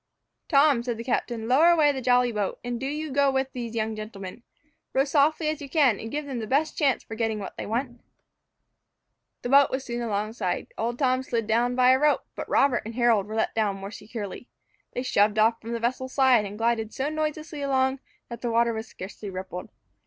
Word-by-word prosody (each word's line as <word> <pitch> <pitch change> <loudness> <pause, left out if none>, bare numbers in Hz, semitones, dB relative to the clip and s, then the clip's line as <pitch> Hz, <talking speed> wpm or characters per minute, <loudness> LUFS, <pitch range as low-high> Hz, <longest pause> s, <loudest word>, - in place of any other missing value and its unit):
"Tom," 280 -4 +5
said 240 -1 -3
the 230 - -5
captain, 235 -2 -2
"lower 285 +8 +5
away 310 -4 +5
the 265 -2 -4
jolly 245 0 +3
boat, 210 -3 -2
and 240 -1 -3
do 265 - -3
you 300 +1 -4
go 280 +1 +3
with 265 0 -1
these 235 -2 -5
young 220 0 -1
gentlemen. 215 -1 -8 0.5
Row 265 - +4
softly 305 +2 +2
as 310 0 -2
you 280 - -7
can, 270 - +3
and 225 - -6
give 295 +4 -3
them 265 -4 -4
the 220 - -5
best 295 +6 +1
chance 275 -5 +1
for - - -9
getting 220 -1 -1
what 200 - -7
they - - -6
want." 240 +2 -3 1.4
The 245 - -3
boat 280 +1 +6
was 260 0 -3
soon 240 0 -4
alongside. 210 -3 -2
Old 235 +2 -2
Tom 255 -2 +2
slid 235 -4 -2
down 235 +3 +1
by 255 0 +5
a 260 - +4
rope, 300 +1 +3
but - - -7
Robert 270 -3 +3
and 225 +1 -7
Harold 235 -5 +3
were 215 - -6
let 220 - 0
down 210 -3 0
more 195 +1 -7
securely. 210 +1 -7 0.5
They 250 - -3
shoved 210 -4 +2
off 225 +2 +3
from 230 +1 -6
the 235 - -2
vessel's 255 +2 -2
side, 260 -6 +4
and 200 +1 -7
glided 225 -1 0
so 270 +2 -2
noiselessly 310 -1 -3
along, 265 -1 +1 0.3
that 235 - -8
the 240 - -1
water 235 0 +2
was 220 0 -5
scarcely 200 +1 -8
rippled. 185 -1 -6
240 Hz, 215 wpm, -26 LUFS, 220-270 Hz, 1.4 s, boat